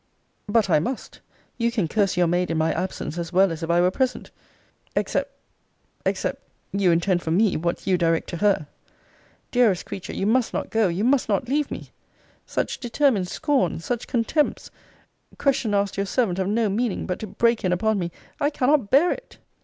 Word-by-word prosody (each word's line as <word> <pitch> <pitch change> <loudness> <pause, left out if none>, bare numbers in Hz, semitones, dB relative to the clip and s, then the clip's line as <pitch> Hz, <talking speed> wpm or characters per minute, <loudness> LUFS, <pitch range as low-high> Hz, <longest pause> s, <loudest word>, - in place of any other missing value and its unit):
But 210 0 +2
I 165 - +4
must 250 - -5 0.4
you 235 0 +2
can 215 -8 0
curse 200 +1 +1
your 180 - +4
maid 175 +2 +1
in 165 - -1
my 160 +1 +2
absence, 180 -3 -4
as 170 0 -4
well 190 0 +4
as 165 0 -5
if 165 - -4
I 170 +1 +4
were 180 +1 +3
present 255 +4 -2 0.6
Except - - -1 0.8
except - - -1 0.3
you 195 -2 +2
intend 175 +1 +2
for 160 - -4
me, 190 +4 +3
what 170 +2 -2
you 185 -2 +2
direct 165 -1 +1
to 170 - -4
her. 200 -5 +2 0.9
Dearest 230 -8 +3
creature, 200 -3 -6
you 195 - -1
must 235 +3 +2
not - - -3
go 220 -2 +3
you 180 +4 -1
must 255 0 +2
not 215 +5 0
leave 290 +3 0
me - - -7 0.6
Such - - -2
determined 240 -5 +1
scorn! 265 - 0
such 240 +7 -3
contempts! 250 +6 0 0.7
Questions 250 -6 +1
asked 200 0 0
your 200 0 -1
servant 195 -4 0
of 190 - 0
no 220 +2 +1
meaning 215 +2 -1
but 180 - -3
to 215 - -5
break 235 +3 +1
in 185 - +1
upon 215 +3 +1
me 170 -2 -2 0.3
I 290 -1 +2
cannot 270 -5 +1
bear 300 +9 +5
it! - - -7
200 Hz, 190 wpm, -24 LUFS, 180-240 Hz, 0.9 s, bear